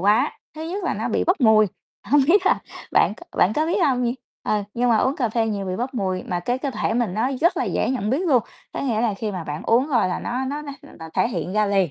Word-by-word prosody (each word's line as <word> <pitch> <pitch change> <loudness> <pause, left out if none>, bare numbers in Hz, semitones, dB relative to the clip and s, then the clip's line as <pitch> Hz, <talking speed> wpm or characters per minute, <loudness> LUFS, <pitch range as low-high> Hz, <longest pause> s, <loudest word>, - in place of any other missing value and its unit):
quá. 205 +3 +2 0.2
Thứ 310 - -7
nhất 365 +4 -4
là - - 0
nó - - -2
bị - - 0
bốc 360 -1 +2
mùi, 220 -3 +6 0.4
hông 290 +3 +4
biết 375 +4 +4
là - - +4 0.3
bạn - - +4
c - - -16
bạn 185 - +4
có 310 +1 +1
biết 350 +5 +1
hông 260 -4 +2
nh 240 +1 0 0.3
ờ, 210 -1 +1
nhưng 245 0 +2
mà 225 - +5
uống 260 +5 +1
cà 245 -5 0
phê 225 0 0
nhiều 200 -3 -2
bị 185 0 -2
bốc 255 +5 -3
mùi, 190 -5 -1
mà 175 -2 -3
cái 245 +8 -1
cơ 275 +1 -2
thể 225 -2 -1
mình 230 -6 0
nó 230 +5 +1
rất 345 +4 +3
là - - 0
dễ - - 0
nhận 215 -5 -1
biết 270 - +2
luôn, 255 -8 +4 0.3
có - - -4
nghĩa 235 -6 0
là 225 -3 +1
khi 210 +1 -4
mà 180 -3 -5
bạn 150 0 -5
uống 240 +4 +3
rồi 240 -9 +2
là - - -2
nó 255 +2 -3
nó 290 +3 -3
nó 285 -1 -7 0.3
nó 160 -1 -8
thể - - +2
hiện 195 -5 -3
ra 215 0 +2
liền, 195 -4 +2
235 Hz, 285 wpm, -23 LUFS, 205-275 Hz, 0.4 s, mùi